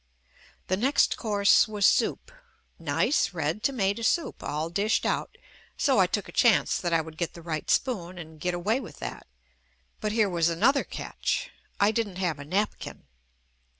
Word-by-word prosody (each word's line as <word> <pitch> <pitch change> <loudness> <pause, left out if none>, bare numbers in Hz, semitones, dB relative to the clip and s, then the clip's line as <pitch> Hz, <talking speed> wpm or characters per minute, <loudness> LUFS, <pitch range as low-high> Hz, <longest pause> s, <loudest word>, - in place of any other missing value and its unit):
The 185 - 0
next 265 +7 +2
course 205 -3 +3
was 210 -2 0
soup - - +2 0.2
— - - -40
nice 200 -9 +1
red 160 +5 -1
tomato 215 -5 0
soup, 325 +8 0
all 155 +3 -3
dished 205 +4 +1
out, - - -2 0.4
so - - +3
I - - +5
took - - -2
a - - -10
chance - - +3
that 175 - -2
I 165 -1 +3
would 160 0 -11
get 170 - -3
the 170 - -10
right 155 -2 -4
spoon 185 -9 0
and 160 -2 -10
get 180 +1 -1
away 210 +8 0
with 240 - -10
that - - -7 0.4
— 65 0 -39
but 210 - -1
here 215 -1 +2
was 170 -3 +1
another 240 - +3
catch, - - -3 0.3
I 200 +1 +4
didn't 220 -4 -2
have 175 -5 -2
a 145 - -8
napkin. 200 +7 -3
190 Hz, 180 wpm, -27 LUFS, 165-215 Hz, 0.4 s, I